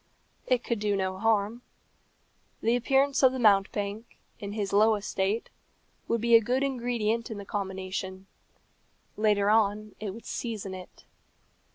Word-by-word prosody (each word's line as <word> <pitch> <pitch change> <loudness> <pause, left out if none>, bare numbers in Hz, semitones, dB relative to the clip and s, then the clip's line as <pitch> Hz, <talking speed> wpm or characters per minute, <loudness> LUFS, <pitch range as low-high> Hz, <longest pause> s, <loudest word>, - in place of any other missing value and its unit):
It 250 -2 +2
could 235 -3 -2
do 205 -1 0
no 190 -1 -2
harm. 225 +1 +1 1.0
The 230 +2 +2
appearance 270 +3 +2
of 260 -1 +6
the - - -3
mountebank, 205 0 +1 0.2
in 200 0 -6
his 205 -2 -3
low 215 +2 +5
estate, 205 +1 -2 0.6
would 230 -1 0
be 235 0 +2
a 230 - +9
good 250 +5 0
ingredient 235 -3 -1
in 220 - -5
the 200 - -7
combination; 190 -1 -4 0.9
later 210 -1 +2
on 215 -1 +1
it 215 - -4
would 230 +4 -11
season 215 -5 -4
it. 185 -1 -11
215 Hz, 145 wpm, -28 LUFS, 200-235 Hz, 1.0 s, a